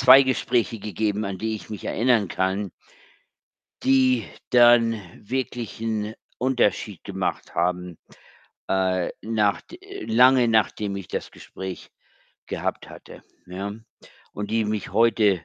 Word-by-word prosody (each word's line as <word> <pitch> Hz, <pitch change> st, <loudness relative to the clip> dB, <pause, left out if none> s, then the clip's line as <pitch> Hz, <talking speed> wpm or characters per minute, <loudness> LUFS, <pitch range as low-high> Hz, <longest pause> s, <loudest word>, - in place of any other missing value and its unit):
2 130 Hz, +1 st, +9 dB
Gespräche 120 Hz, -3 st, 0 dB
gegeben, 105 Hz, +1 st, -2 dB
an 95 Hz, -2 st, -4 dB
die 110 Hz, 0 st, -2 dB
ich 110 Hz, -, -9 dB
mich 105 Hz, -, -7 dB
erinnern 115 Hz, -4 st, +2 dB
kann 95 Hz, +2 st, -1 dB, 1.1 s
die 130 Hz, -3 st, +4 dB, 0.3 s
dann 120 Hz, -1 st, +6 dB, 0.4 s
wirklich 125 Hz, -4 st, -3 dB
'n 110 Hz, -1 st, -2 dB, 0.2 s
Unterschied 120 Hz, -7 st, 0 dB
gemacht 95 Hz, -2 st, -3 dB
haben, 90 Hz, 0 st, -1 dB, 0.7 s
äh, 95 Hz, -2 st, +1 dB
nachd 110 Hz, -, -1 dB, 0.3 s
lange 125 Hz, +1 st, +5 dB
nachdem 105 Hz, -2 st, +1 dB
ich 95 Hz, -2 st, -7 dB
das -, -, -4 dB
Gespräch 95 Hz, -1 st, -8 dB, 0.6 s
gehabt -, -, -3 dB
hatte, -, -, -13 dB, 0.2 s
ja? 95 Hz, +3 st, -5 dB, 0.6 s
Und 105 Hz, 0 st, -5 dB
die 115 Hz, 0 st, +1 dB
mich 105 Hz, -3 st, -3 dB
heute, 105 Hz, -4 st, +3 dB
110 Hz, 115 wpm, -24 LUFS, 100-120 Hz, 1.1 s, 2